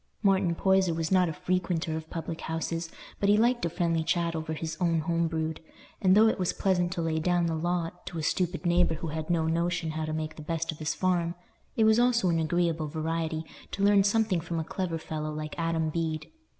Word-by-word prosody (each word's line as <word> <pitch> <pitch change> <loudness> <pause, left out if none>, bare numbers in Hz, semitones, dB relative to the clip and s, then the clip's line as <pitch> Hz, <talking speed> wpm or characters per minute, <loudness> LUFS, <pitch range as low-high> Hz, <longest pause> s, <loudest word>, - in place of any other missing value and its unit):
Martin 190 -3 +3
Poyser 190 -2 +3
was 165 +1 -2
not 185 -2 +4
a - - -3
frequenter 175 -1 -1
of 160 0 -6
public 165 -1 -5
houses, 165 0 -3 0.3
but 200 - +2
he 205 - +6
liked 240 +2 +2
a - - 0
friendly 165 -1 0
chat 170 0 0
over 160 0 -3
his 160 +1 -4
own 165 -2 +2
home 170 +1 0
brewed; 160 -1 -2 0.4
and 190 0 +5
though 220 +1 +7
it 220 - +1
was 180 -1 0
pleasant 180 -2 +1
to 175 -2 -2
lay 160 -1 0
down 175 +1 +2
the 165 - 0
law 170 +1 -1
to 175 - -6
a 160 - -3
stupid 180 +3 -1
neighbour 175 -1 +3
who 160 +1 -5
had 155 +1 -4
no 165 -2 +2
notion 170 0 0
how 155 0 -3
to 155 - -3
make 155 0 -4
the - - -7
best 165 +2 -2
of 155 - -11
his 155 0 -1
farm, 175 -2 0 0.4
it 225 - +3
was 220 +1 +5
also 240 -6 +3
an 165 -1 +2
agreeable 165 -1 0
variety 160 +1 -2 0.2
to 200 - -3
learn 200 -1 +5
something 205 -3 +2
from 170 0 -4
a - - -1
clever 170 0 -3
fellow 155 -1 -4
like 155 0 -5
Adam 165 -1 0
Bede. 160 -1 -3
165 Hz, 225 wpm, -28 LUFS, 160-180 Hz, 0.4 s, though